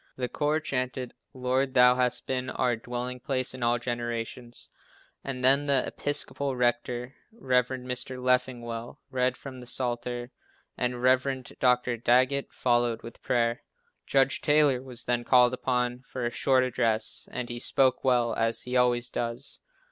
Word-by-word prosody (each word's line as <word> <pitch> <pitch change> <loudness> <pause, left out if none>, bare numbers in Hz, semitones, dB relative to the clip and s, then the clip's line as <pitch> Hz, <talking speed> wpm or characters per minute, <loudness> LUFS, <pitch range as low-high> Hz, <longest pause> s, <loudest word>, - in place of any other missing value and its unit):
The 125 -1 -2
choir 150 +4 0
chanted 130 -4 -3 0.2
"Lord, 130 0 -1
Thou 125 0 +7
hast 125 -1 0
been 130 -1 -2
our 125 -2 0
dwelling 125 +2 -5
place 130 0 -2
in 130 - -9
all 120 0 +2
generations," 120 0 -5 0.5
and 130 -2 -5
then 140 +3 +4
the 135 -2 +2
Episcopal 140 -1 -1
rector, 120 +1 -1 0.2
Rev. 130 - +1
Mr. 125 0 -3
Leffingwell, 125 -1 -1
read 125 -1 +1
from 130 -2 -9
the 125 - -10
psalter, 120 0 -3 0.4
and 125 0 -2
Rev. 130 +1 +2 0.2
Dr. 125 -1 +2
Daggett 130 +4 +2
followed 120 -2 +1
with 115 - -10
prayer. 120 -1 0 0.5
Judge 135 -1 +2
Taylor 145 -4 +3
was 130 -2 -5
then 120 0 0
called 125 0 +5
upon 125 -1 -1
for 130 -1 -6
a 120 - -1
short 130 +2 +2
address, 115 -3 0
and 125 -1 -4
he 120 0 -4
spoke 130 +1 +2
well, 120 -3 +2
as 115 0 0
he 125 0 -4
always 125 -1 +3
does. 120 +3 -3
125 Hz, 150 wpm, -28 LUFS, 120-130 Hz, 0.5 s, Thou